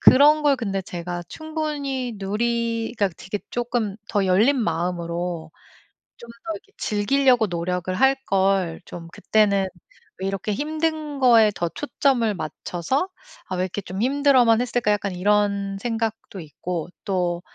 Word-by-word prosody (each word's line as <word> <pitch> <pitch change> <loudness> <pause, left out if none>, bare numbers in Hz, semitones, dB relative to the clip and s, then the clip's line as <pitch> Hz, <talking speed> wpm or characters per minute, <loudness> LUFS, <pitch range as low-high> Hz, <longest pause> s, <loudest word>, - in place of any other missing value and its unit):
그런 300 +3 +7
걸 285 -2 +4
근데 195 -5 -2
제가 175 0 -5
충분히 295 -5 -3
누리 230 +3 -1
그러니까 200 -5 +1
되게 190 +3 -5
쪼끔 235 -4 -1
'더 200 -2 +1
열린 215 +10 +4
마음으로 170 -2 -2 0.7
좀 235 - -12 0.2
더 330 - -2
이렇게 405 +3 -11
즐기려고 245 +3 +3
노력을 180 +1 -2
할걸. 195 -8 +2
좀 165 -1 -9
그때는 200 -3 +2 0.5
왜 190 - -2
이렇게 195 +2 -2
힘든 310 +2 -2
거에 230 -4 +6
더 175 - -1
초점을 260 - +1
맞춰서 175 - -2 0.4
아 185 - -2
왜 180 - 0
이렇게 185 +2 -3
좀 190 +1 -5
힘들어만 260 -3 +4
했을까.' 245 -3 +1
약간 200 -1 0
이런 200 +1 +1
생각도 225 -2 -3
있고. 165 +2 -5 0.2
또 180 -3 0
210 Hz, 285 characters per minute, -23 LUFS, 185-255 Hz, 0.7 s, 그런